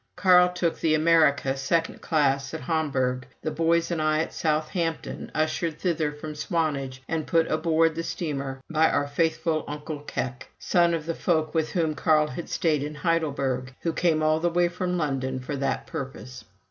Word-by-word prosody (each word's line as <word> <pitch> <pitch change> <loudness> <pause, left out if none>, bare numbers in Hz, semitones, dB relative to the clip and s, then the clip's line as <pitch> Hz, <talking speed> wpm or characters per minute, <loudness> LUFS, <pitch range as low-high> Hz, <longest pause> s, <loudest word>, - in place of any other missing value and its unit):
Carl 180 -2 +6
took 175 -2 -1
the 155 -1 +2
Amerika, 155 -4 +3
second 165 +5 -1
class, 140 -3 +1
at - - -5
Hamburg; 130 -4 -1 0.2
the 155 - -1
boys 165 +1 +1
and 165 -2 -1
I 155 0 +2
at - - -4
Southampton, 160 +2 -2
ushered 155 +1 0
thither 160 -4 0
from 150 +1 -7
Swanage 150 -5 -2
and 160 -2 -2
put 165 -1 +3
aboard 165 +1 +2
the 165 - -3
steamer 140 -6 -4
by 160 0 +3
our 145 - +1
faithful 160 +2 0
Onkel 150 0 -6
Keck, 125 0 -4
son 170 -1 +2
of 155 -2 -5
the 165 - -1
folk 160 -3 0
with 160 -2 0
whom 160 -4 +1
Carl 150 -1 +2
had 160 +7 -6
stayed 155 -4 +1
in 150 +1 -4
Heidelberg, 140 -5 -1
who 165 - -1
came 160 -3 +1
all 155 0 +3
the 175 +1 +1
way 175 +1 +2
from 180 0 -2
London 135 -4 -1
for 130 +3 -5
that 135 0 -1
purpose. 130 -1 -7
155 Hz, 175 wpm, -26 LUFS, 140-165 Hz, 0.2 s, Carl